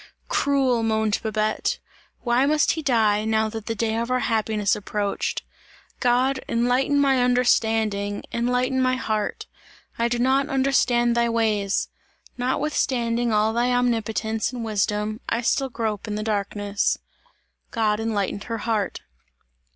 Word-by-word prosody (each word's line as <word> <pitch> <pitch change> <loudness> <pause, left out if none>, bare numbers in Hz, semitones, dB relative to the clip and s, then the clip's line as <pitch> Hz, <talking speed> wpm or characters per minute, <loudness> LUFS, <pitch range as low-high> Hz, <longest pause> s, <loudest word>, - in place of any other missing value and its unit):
"Cruel!" 270 -4 +2
moaned 220 -1 +1
Babette, 215 -1 -1 0.4
"why 245 +2 +2
must 300 0 +3
he 320 - -3
die, 220 -7 +2
now 220 0 +1
that 220 -1 -7
the 225 - -2
day 220 0 -1
of 235 +1 -2
our 255 0 +1
happiness 215 -3 +1
approached. 205 0 -2 0.6
God! 255 +2 +2
Enlighten 250 +4 +2
my 270 -2 +3
understanding! 220 -5 +1
Enlighten 250 +2 +1
my 255 0 +2
heart! 215 -4 -2 0.5
I 235 - +3
do 240 0 -1
not 265 +3 +2
understand 260 -3 +2
thy 235 0 +2
ways! 215 -3 0 0.5
Notwithstanding 245 -3 0
all 215 +1 +2
thy 240 +2 +1
omnipotence 225 -2 0
and 240 -2 -5
wisdom, 210 0 -1
I 230 - 0
still 270 +3 +1
grope 220 -4 -3
in 210 - -3
the 215 - -3
darkness." 205 -1 -1 0.7
God 215 -2 0
enlightened 205 -3 -2
her 230 -1 -3
heart. 215 -3 -2
230 Hz, 135 wpm, -24 LUFS, 215-250 Hz, 0.7 s, must